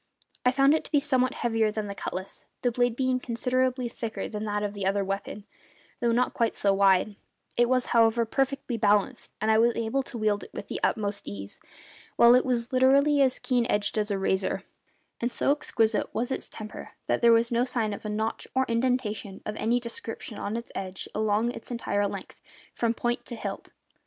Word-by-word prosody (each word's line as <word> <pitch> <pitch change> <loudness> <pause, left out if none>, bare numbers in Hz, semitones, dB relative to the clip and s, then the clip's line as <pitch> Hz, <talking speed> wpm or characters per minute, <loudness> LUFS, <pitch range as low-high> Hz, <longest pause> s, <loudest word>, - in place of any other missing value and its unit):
I 250 - +4
found 275 +2 +4
it 315 - +1
to - - -13
be 295 - +5
somewhat 260 -2 +1
heavier 225 -2 +1
than 215 0 -3
the 200 - -5
cutlass, 190 -1 -6 0.2
the 245 - +2
blade 245 0 +1
being 255 0 +1
considerably 255 +1 0
thicker 230 -1 -5
than 210 0 -5
that 210 0 -1
of 205 -1 -2
the 200 -1 -5
other 195 +1 +1
weapon, 195 +1 -4 0.5
though 235 -1 +2
not 245 +2 +1
quite 230 -2 0
so 200 -1 +3
wide; 195 +1 +3 0.4
it 240 0 +3
was, 255 -1 +2
however, 230 0 +4
perfectly 270 0 -1
balanced 210 -2 +1
and 220 +1 +2
I 220 - +5
was 235 +1 +4
able 230 +4 0
to 260 -2 -8
wield 215 -2 0
it - - -13
with - - -7
the - - -3
utmost 205 -2 -1
ease, 100 0 -7 0.6
while 235 0 +7
it 255 +1 +4
was 245 0 -1
literally 280 +3 +4
as 260 -2 +3
keen 245 -3 +1
edged 205 -1 0
as 210 -1 0
a 200 - 0
razor; 190 0 0 0.6
and 240 +1 -1
so 275 - +2
exquisite 225 -6 +1
was 240 +3 -1
its - - -4
temper 215 -1 -9
that - - 0
there 235 -1 +6
was 230 +1 +4
no 240 +1 +2
sign 230 -4 -1
of - - -8
a 215 - -4
notch 220 +1 -2
or 260 0 +3
indentation 230 -5 -1
of 210 - -4
any 235 +3 +1
description 230 -2 -6
on 210 +3 -3
its 235 - -7
edge 190 -1 -4
along 215 +2 +1
its - - -10
entire 205 -4 0
length, - - -8 0.3
from 235 -1 0
point 240 +1 -1
to 240 - -6
hilt. 200 -3 -6
230 Hz, 205 wpm, -27 LUFS, 210-250 Hz, 0.6 s, while